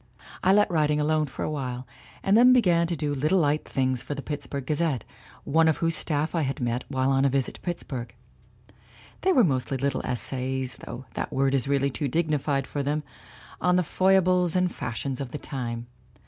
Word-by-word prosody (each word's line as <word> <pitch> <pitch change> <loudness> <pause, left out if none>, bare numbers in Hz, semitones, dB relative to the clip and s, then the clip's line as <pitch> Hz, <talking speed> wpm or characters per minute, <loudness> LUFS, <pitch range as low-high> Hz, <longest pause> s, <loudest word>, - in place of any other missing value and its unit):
I 185 - +5
let 205 -1 +4
writing 150 -2 +2
alone 155 0 +1
for 135 - -6
a - - -2
while, 130 -4 -4 0.4
and 195 - +3
then 250 +3 +7
be 255 - +6
gan 170 -4 +3
doing 150 -4 -2
little 155 +7 +2
light 150 -3 +1
things 130 -2 0
for 145 - -5
the 140 - -6
Pittsburgh 145 -2 -5
Ga 155 - 0
zette, 150 -6 0 0.4
one 160 +2 +3
of 160 - +3
whose 165 -1 +1
staff 150 0 -1
I 165 - +1
had 135 -2 -2
met 120 0 -1
while 130 -1 0
on 135 0 +3
a 140 - +4
visit 135 -1 0
to - - -14
Pittsburgh. 135 -8 -5 1.1
They 380 - +3
were 260 -9 +5
mostly 135 -4 0
little 140 +2 -1
essays 130 +1 -2
though 120 +2 -8
that - - -3
word 135 0 +1
is 135 0 +1
really 140 0 +1
too 145 +2 -2
dignified 145 -2 0
for 145 - -3
them 150 +2 -1 0.6
on 180 0 +3
the 180 - +3
foibles 185 0 +3
and 180 -1 +2
fashions 125 +3 -4
of 135 - -4
the 150 - -5
time. 120 -5 -5
145 Hz, 205 wpm, -26 LUFS, 130-165 Hz, 1.1 s, then